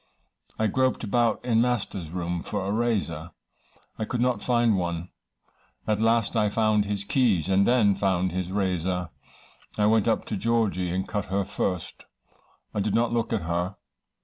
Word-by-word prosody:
I 110 - +1
groped 130 +5 +1
about 115 +2 +1
in 115 -2 +3
master's 105 -8 -1
room 85 0 -3
for 100 +1 -3
a 100 - -1
razor 100 -8 -1 0.7
I 110 - -1
could 120 - -3
not 125 0 +1
find 120 -3 +2
one 85 -1 -2 0.8
at 105 -1 0
last 115 0 +2
I 105 -2 +3
found 110 -1 +2
his 100 -1 -2
keys, 100 - +2
and 95 +1 +3
then 115 -5 +4
found 95 -2 0
his 90 +1 -3
razor. 90 -3 -1 0.7
I 105 - +3
went 110 0 +3
up 110 - +1
to - - -3
Georgy, 105 -5 0
and 95 +2 -2
cut 105 -1 -2
her 95 0 -1
first; 90 -2 -3 0.7
I - - -1
did 100 0 0
not 120 0 +2
look 115 -1 0
at 110 -6 0
her. 85 +3 -2
105 Hz, 170 wpm, -26 LUFS, 90-115 Hz, 0.8 s, then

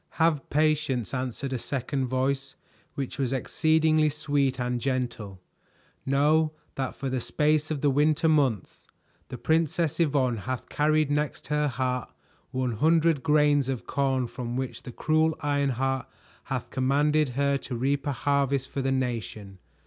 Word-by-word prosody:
"Have 160 -4 +2
patience," 150 -6 +1
answered 130 +1 -3
a 130 - -2
second 135 +1 -2
voice 135 +2 -1 0.4
which 140 +1 -4
was 130 -2 0
exceedingly 155 +3 +2
sweet 145 -3 0
and 125 0 -1
gentle. 120 -7 -3 0.7
"Know 155 +3 +3 0.2
that 135 -2 -3
for 135 - -4
the 130 -1 -1
space 150 +4 +1
of 150 -3 -3
the 145 - +3
winter 150 +3 +2
months 140 - 0 0.4
the 125 - -7
Princess 160 +1 +1
Yvonne 135 -7 +2
hath 130 +5 -5
carried 155 0 +2
next 150 0 -2
her 150 0 +1
heart 125 -1 -2 0.4
one 130 -1 -1
hundred 160 +5 +3
grains 150 -2 +3
of 130 -3 -3
corn 135 -2 0
from 120 0 -5
which 130 -1 -4
the 125 - -8
cruel 155 +4 +1
Ironheart 135 -3 0 0.4
hath - - -4
commanded 145 +3 +2
her 140 0 +2
to 130 - -6
reap 140 +4 0
a - - +1
harvest 140 0 0
for 140 - -3
the 135 0 0
nation. 115 -6 -3
140 Hz, 150 wpm, -27 LUFS, 130-150 Hz, 0.7 s, Know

